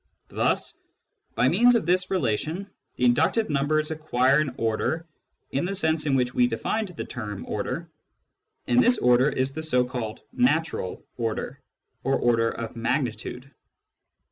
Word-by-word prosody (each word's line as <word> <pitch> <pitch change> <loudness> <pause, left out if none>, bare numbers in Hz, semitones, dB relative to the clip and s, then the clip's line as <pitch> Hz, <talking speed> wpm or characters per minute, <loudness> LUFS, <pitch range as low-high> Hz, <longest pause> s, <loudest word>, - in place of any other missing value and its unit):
Thus - - -1 0.6
by - - +3
means 240 - +5
of 225 - +1
this 185 +2 +1
relation 160 - -1 0.3
the 125 - +1
inductive 160 - +2
numbers 150 +2 +1
acquire 140 -3 +2
an 155 -3 0
order 115 +9 -1 0.5
in 135 - 0
the 195 +3 -2
sense 160 -4 +1
in 135 - +2
which 125 -1 +1
we 125 - +4
defined 210 - -2
the 180 -4 -7
term 105 -5 -6
" - - -20
order," - - -3 0.8
and 120 0 +4
this 245 - +4
order 125 +3 +4
is 130 -1 -1
the 160 - -4
so 125 -6 +2
called 120 -4 -5
" - - -44
natural 145 - 0
" - - -45
order, 115 -2 -3 0.4
or 135 +1 +2
order 115 -2 +2
of 115 0 -6
magnitude. 125 +1 -3
135 Hz, 160 wpm, -25 LUFS, 120-160 Hz, 0.8 s, means